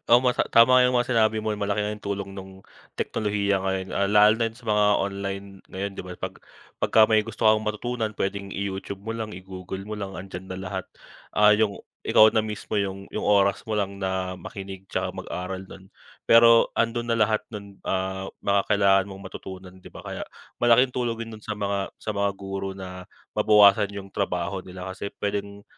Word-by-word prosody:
Ang 120 - +8
masa 125 - +2
tama 125 +2 +7
’yong 125 - +3
mga 120 - +1
sinabi 110 -1 +3
mo, 110 - -3
malaki 100 0 -1
nga 105 +1 -1
’yong 105 - -17
tulong 100 -1 -3
nung 95 0 -10 0.4
teknolohiya 100 -2 0
ngayon, 95 0 -1
ah, 100 - +2
lalo 105 +1 +6
na 115 - +1
’yon 115 - -16
sa 125 - -17
mga 105 0 +3 0.2
online 100 0 -3 0.3
ngayon, 100 +2 -3
’di - - -5
ba? 90 - -7
Pag 95 0 -4 0.4
pagka 110 -1 +4
may 110 -1 +3
gusto 115 -1 +1
kang 110 0 +3
matutunan, 110 +1 -2
puwedeng 100 -1 -3
i-YouTube 100 0 -4
mo 110 +3 -5
lang, 110 -2 -5
i-Google 95 0 -7
mo 110 - -4
lang, 100 -2 -5
andiyan 95 0 -7
na 95 - -5
lahat. 95 0 -4 0.5
Ah, 105 0 +6
’yong 105 -2 0 0.2
ikaw 110 - +7
na 110 - +2
mismo 105 0 -4
’yong 100 -1 -2
'yong - - -4
oras 100 -1 +3
mo 110 - -5
lang 100 -1 -2
na 95 -1 -2
makinig, 95 0 -8
tsaka - - -1
mag-aral 95 +1 -5
do'n. 95 0 -13 0.4
Pero 115 0 +7
andon 120 +1 0
na 115 - +2
lahat 110 -1 +2
no'n, 100 -3 -10
ah, 95 0 -2 0.2
mga 100 0 +3
kailangan 100 -2 +4
mong 95 0 -9
matutunan, 95 -1 -9
’di - - -12
ba? - - -12
Kaya - - -6 0.4
malaking 120 +2 +5
tulong 120 -2 -1
din - - -11
no'n - - -14
sa 110 - -4
mga 100 -1 -1
sa 110 - -4
mga 100 0 +1
guro 95 0 -5
na 90 -1 -8 0.2
mabawasan 105 -1 +5
’yong 100 -1 -9
trabaho 90 -2 -2
nila, 90 0 -9
kasi 100 +1 -5
puwedeng 100 0 -4
100 Hz, 195 wpm, -25 LUFS, 95-110 Hz, 0.5 s, Ang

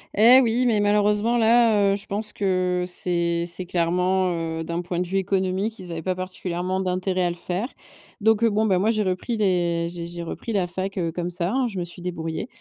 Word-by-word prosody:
Eh 235 +5 +8
oui 240 +1 +1
mais 225 -4 +3
malheureusement 210 +3 +2
là, 225 -3 +4
heu, - - +2
je 200 - -7
pense 210 +1 -3
que 185 -2 0
c'est 170 -1 0
c'est 180 +1 -4
clairement, 180 +2 +1 0.3
heu, - - -3
d'un 170 +1 -3
point 175 0 -3
de 180 - -1
vue 195 +2 -1
économique, 195 +3 -1
ils 180 -2 -8
avaient 165 -1 -4
pas 185 +2 -1
particulièrement 185 0 -3
d'intérêt 185 0 -1
à - - +2
le 175 - -4
faire. 180 +6 -3 0.5
Donc 220 +1 +3
bon, 215 0 +2
bah 190 -4 +2
moi 205 +4 +2
j'ai 215 -2 0
repris 185 +5 -2
les 175 -4 +1
j'ai 170 -1 -6
j'ai 170 0 -6
repris 225 +7 -5
la 195 -3 +1
fac, 190 +2 -4
heu, 170 -3 -1
comme 175 +1 -3
ça 175 +1 -2
hein. 260 +1 +1
Je 205 -5 -6
me - - -1
suis 175 +1 -9
débrouillée. 165 +2 -4
185 Hz, 220 wpm, -24 LUFS, 175-210 Hz, 0.5 s, Eh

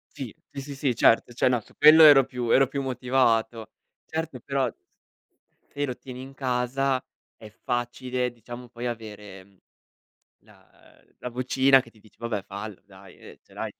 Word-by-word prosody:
Sì, 130 -7 -7 0.2
sì, 140 0 -7
sì, 135 -3 0
certo, 115 +1 +3
cioè 120 - +1
no, 125 -3 +1
su - - -22
quello 155 +2 +8
ero 140 -4 +8
più 125 -3 -5
ero 135 +1 +5
più 140 +1 -4
motivato. 120 -3 0 0.4
Certo, 160 -6 -5
però 135 -3 -1 1.1
se 145 0 -1
lo 125 -2 -5
tieni 130 -1 -10
in 135 +1 -10
casa 130 +1 -1 0.4
è 110 - -12
facile 125 +2 -3
diciamo 120 +1 -10
poi 120 +1 -6
avere, 105 -4 -8
mhmm, 100 -1 -27 0.9
la - - -22 0.4
uhm, - - -32
la 125 - -5
vocina 130 +2 +3
che 115 - -18
ti 110 - -23
dice: 110 - -22
"Vabbè 115 -4 -3
fallo 100 +1 -8
dai, 95 -1 -16
uhm, - - -12
ce - - -22
l'hai" - - -5
125 Hz, 170 wpm, -25 LUFS, 115-135 Hz, 1.1 s, quello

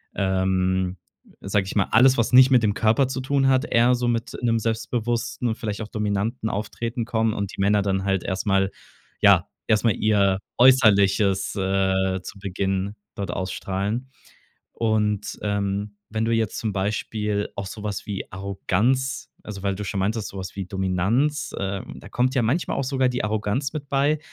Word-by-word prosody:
ähm, 95 -1 0 0.4
sage 100 0 0
ich - - -6
mal 100 - +3
alles, 130 +3 +6
was 115 +2 0
nicht 130 +1 +8
mit 125 -3 +5
dem 105 -1 +2
Körper 115 +6 +2
zu 130 0 -4
tun 135 0 +1
hat, 130 +2 +3
eher 120 +2 +3
so 120 0 -1
mit 115 0 -1
'nem 115 -1 +2
selbstbewussten 115 +2 -2
und 110 - 0
vielleicht 105 -1 -4
auch 105 - -5
dominanten 105 +2 -2
Auftreten 115 +3 -3
kommen 110 -2 0
und 100 -1 -4
die - - -3
Männer 100 +1 +3
dann 95 -1 0
halt 95 -2 0
erst 95 +2 -3
mal 95 0 +2 0.5
ja, - - +5 0.2
erst 110 0 +2
mal 115 -4 +4
ihr 100 -3 +2 0.2
Äußerliches, 100 -6 +4
äh, 95 -1 +1
zu 100 - -9
Beginn 95 +1 -2 0.2
dort 100 -4 -4
ausstrahlen. 100 +7 -3 0.6
Und, 105 -2 0
ähm, 100 0 -2
wenn 110 +1 -1
du 115 - +1
jetzt 115 -2 0
zum 110 -3 -2
Beispiel 105 +1 -2
auch 100 -1 -4
so 105 +2 -8
was 105 -2 -4
wie 100 -2 -4
Arroganz 120 +7 -1
also 100 -2 -8
weil 100 -1 0
du 105 +2 -5
schon 100 0 -3
meintest, 105 +2 -1
so 100 - -10
was 95 - -6
wie 95 -2 -4
Dominanz, 100 - 0
äh, 100 0 -2
da - - -11
kommt 130 +2 +1
ja 125 - +2
manchmal 130 +10 0
auch 140 - -1
sogar 130 -1 +1
die 125 -3 -2
Arroganz 110 +6 -1
mit 145 -3 -6
bei. 145 +2 +2
105 Hz, 180 wpm, -24 LUFS, 95-120 Hz, 0.6 s, nicht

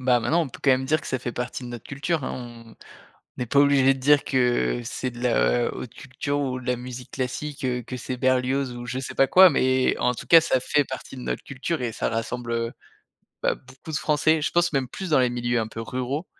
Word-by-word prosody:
bah, 125 -1 +3
maintenant, 165 +9 +2
on 155 - -4
peut - - -12
quand 140 - +4
même 130 0 +2
dire 155 +3 +2
que - - -11
ça 130 - -1
fait 120 0 -5
partie 125 +2 -4
de - - -7
notre 120 -2 -8
culture 145 +2 -2
hein. - - -3 0.3
On 115 - -16 0.6
on - - -4
n'est - - 0
pas 140 - +3
obligés 140 -2 +5
de 135 - -9
dire 145 +2 +4
que 120 - +1
c'est 130 - -3
de 120 0 -10
la - - +2
haute - - -8
culture 140 +2 -3
ou 130 -3 -2
de 130 - -12
la 125 - +2
musique 125 0 -8
classique, 130 +2 -4
heu, 125 -1 -1
que 125 - -7
c'est 125 +1 -5
Berlioz 130 +1 +1
ou 120 0 -7
je 125 +1 -3
sais 130 - -6
pas 135 - +4
quoi, 185 +4 +8
mais 130 -2 +2
en 125 - +1
tout - - -8
cas, 165 -1 +8
ça 130 -5 +1
fait 145 +3 +2
partie 130 +1 -7
de - - -7
notre - - -3
culture 135 +3 -3
et 120 - -1
ça - - -1
rassemble, 120 +1 -3
heu, 115 0 -1 0.7
bah, - - +2
beaucoup 130 +4 -12
de 150 - 0
Français, 155 +1 +2
je - - -1
pense 175 0 +2
même 135 -2 0
plus 190 +7 -6
dans 150 - +4
les 125 -1 +3
milieux 120 0 -1
un 110 - -2
peu 115 +1 -7
ruraux, 130 +7 -3
130 Hz, 255 wpm, -24 LUFS, 120-140 Hz, 0.7 s, quoi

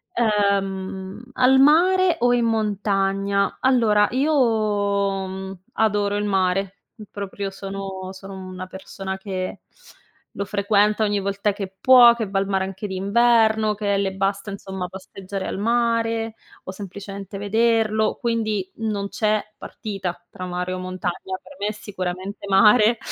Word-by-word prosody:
Ehm, 195 -2 0
al 255 +1 +4
mare 355 +5 +5
o 245 0 +3
in 240 -1 +2
montagna? 200 -2 0
Allora, 225 -5 +4
io, 275 +5 +1 0.9
mhmm, 190 0 -7
adoro 205 -2 +1
il 205 - -1
mare. 195 -1 +1 0.4
Proprio 200 0 -5
sono 195 -1 -6
sono 195 +1 -10
una 185 -1 -7
persona 190 +1 -7
che 190 -2 -5 0.7
lo 200 - -4
frequenta 205 +1 +2
ogni 205 -1 +1
volta 200 +1 0
che 195 -1 -6
può, 245 -2 +8
che 225 -3 -3
va 195 - -1
al 195 - -1
mare 190 -1 0
anche 195 +2 -7
d'inverno, 220 +2 +3
che 200 -1 0
le 195 -1 -1
basta, 195 +1 -2
insomma, 190 -2 -5
passeggiare 190 +1 -7
al - - -4
mare 230 0 0 0.3
o - - -6
semplicemente 195 0 -8
vederlo. 220 +1 +1
Quindi, 215 -5 -1
non 210 -3 -2
c'è 215 0 0
partita 185 -5 -6
tra 185 - -7
mare 180 0 -3
o 185 - -4
montagna: 185 0 -4
per - - -15
me, 205 - -1
è - - 0
sicuramente 195 -1 -6
mare, 210 +3 +5
200 Hz, 140 wpm, -22 LUFS, 190-220 Hz, 0.9 s, può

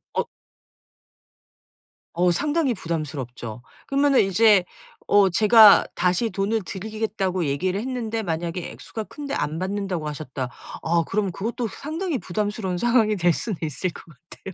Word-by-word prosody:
어 - - 0 1.9
어 175 +1 +3
상당히 290 - +1
부담스럽죠. 135 - -5 0.3
그러면은 275 -1 +3
이제 195 0 +4 0.4
어 200 -1 +5
제가 215 +2 +7
다시 180 +6 +1
"돈을 215 +2 -1
드리겠다."고 195 -2 -2
얘기를 180 +7 -1
했는데 230 -2 -3
만약에 170 0 -3
액수가 220 -1 -7
큰데 285 +4 -7
"안 155 +2 -2
받는다."고 190 -4 -3
하셨다. 140 -4 -5 0.3
아 165 +1 +2
그럼 200 -2 -1
그것도 230 +6 -3
상당히 315 - -4
부담스러운 205 -2 -3
상황이 230 0 +3
될 175 -3 +3
수는 210 +2 -4
있을 160 +4 -2
것 - - -12 0.3
같아요. 190 - -9
195 Hz, 315 characters per minute, -23 LUFS, 170-225 Hz, 1.9 s, 제가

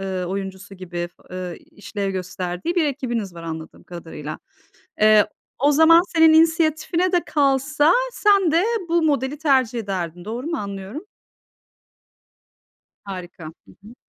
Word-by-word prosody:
ııı, 190 -2 -3
oyuncusu 195 +1 -6
gibi, 175 -2 -5 0.2
ııı, 180 -2 -5
işlev 200 -1 -6
gösterdiği 185 - -4
bir 340 -3 +2
ekibiniz 240 -9 -3
var, 170 - -9
anladığım 160 -1 -8
kadarıyla. 160 -3 -8 0.6
Eee, 215 -1 +6 0.3
o 290 +2 +4
zaman, 320 +3 +6
senin 320 -1 +6
inisiyatifine 325 +2 +2
de 355 -2 +2
kalsa 290 +2 +2 0.2
sen 400 -7 +3
de 335 +3 +3 0.3
bu 340 0 +2
modeli 285 -1 0
tercih 260 -6 +2
ederdin. 180 -4 -4
Doğru 240 +7 -5
mu 335 - -2
anlıyorum? 200 - -6 2.0
Harika. 180 -4 -8
Hı 155 - -7 0.3
hı. 230 +4 -13
220 Hz, 130 wpm, -22 LUFS, -, 2.0 s, Eee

